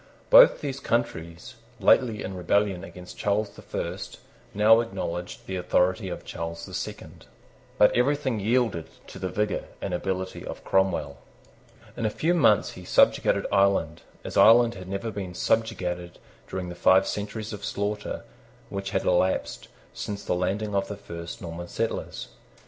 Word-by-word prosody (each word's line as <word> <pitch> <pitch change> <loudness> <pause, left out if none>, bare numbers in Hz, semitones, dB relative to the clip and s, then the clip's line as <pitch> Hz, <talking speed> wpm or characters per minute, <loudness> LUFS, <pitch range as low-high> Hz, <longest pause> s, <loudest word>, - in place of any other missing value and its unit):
Both - - +8
those 140 -2 -4
countries, 90 -11 -2 0.3
lately 115 -5 +3
in 95 - -5
rebellion 95 0 +1
against 90 -2 -11
Charles 105 0 0
the - - -14
First, - - -5 0.3
now 110 +2 +6
acknowledged 90 -6 -4
the 95 - -4
authority 90 +2 +1
of 85 - -7
Charles 85 0 -5
the - - -11
Second. - - -7 0.5
But 105 - +5
everything 130 -2 +1
yielded 110 -5 +1 0.2
to - - -10
the 95 0 -2
vigour 105 +1 -1
and 95 - -4
ability 95 +1 -3
of - - -7
Cromwell. 95 -7 +1 0.8
In 115 - -1
a - - +1
few 165 +10 0
months 140 -12 +4
he 90 - -11
subjugated - - +3
Ireland, 95 -5 +2 0.2
as - - -5
Ireland 115 +1 +7
had 95 -3 -9
never 100 +4 -3
been 95 -4 -6
subjugated 90 -6 -1 0.3
during 90 -1 -4
the - - -6
five 95 +2 +4
centuries 105 +1 -4
of 100 -1 -8
slaughter 105 +1 -3 0.5
which 100 0 -4
had 95 -1 -1
elapsed 90 -9 +1 0.3
since 100 -1 -5
the - - 0
landing 100 +4 -1
of 100 0 0
the 105 - -6
first 85 -4 -8
Norman 85 +1 -6
settlers. - - -3
100 Hz, 155 wpm, -26 LUFS, 90-110 Hz, 0.8 s, Both